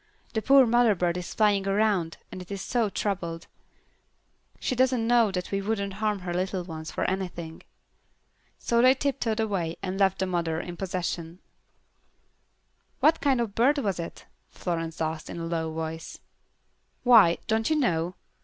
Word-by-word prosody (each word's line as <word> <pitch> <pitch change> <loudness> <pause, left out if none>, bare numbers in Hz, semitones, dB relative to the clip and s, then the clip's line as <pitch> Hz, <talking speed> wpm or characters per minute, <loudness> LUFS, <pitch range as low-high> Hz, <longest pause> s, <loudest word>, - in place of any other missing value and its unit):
"The 220 - 0
poor 270 +2 +6
mother 235 -2 +4
bird 175 -1 0
is 180 - -6
flying 205 -2 +2
around, 195 -5 +1
and 185 - -7
is 195 -1 -4
so 230 -3 0
troubled. 175 -4 -3 1.1
She - - -1
doesn't 255 -2 +2
know 235 -2 +4
that 180 -2 -4
we 195 0 0
wouldn't 200 -1 -2
harm 210 -2 0
her 175 -1 -4
little 185 +1 -1
ones 160 -2 -7
for - - -2
anything." 175 -4 -4 1.0
So 235 0 +1
they 255 +2 +6
tiptoed 260 -5 -1
away 190 -7 -1
and 190 0 -3
left 195 -1 +3
the 190 - 0
mother 170 -3 -1
in 175 +1 -6
possession. 175 -2 -4 1.6
"What 320 +1 +4
kind 270 -4 +2
of 230 -4 -2
bird 265 +7 +3
was 200 -10 -1
it?" 170 - -7 0.2
Florence 165 -2 -4
asked, 160 0 -3
in - - -6
a 165 - -4
low 165 -1 -2
voice. 160 0 -5 0.9
"Why, 225 -9 +7
don't 220 0 0
you 315 - +2
know? 175 - 0
195 Hz, 160 wpm, -27 LUFS, 170-225 Hz, 1.6 s, Why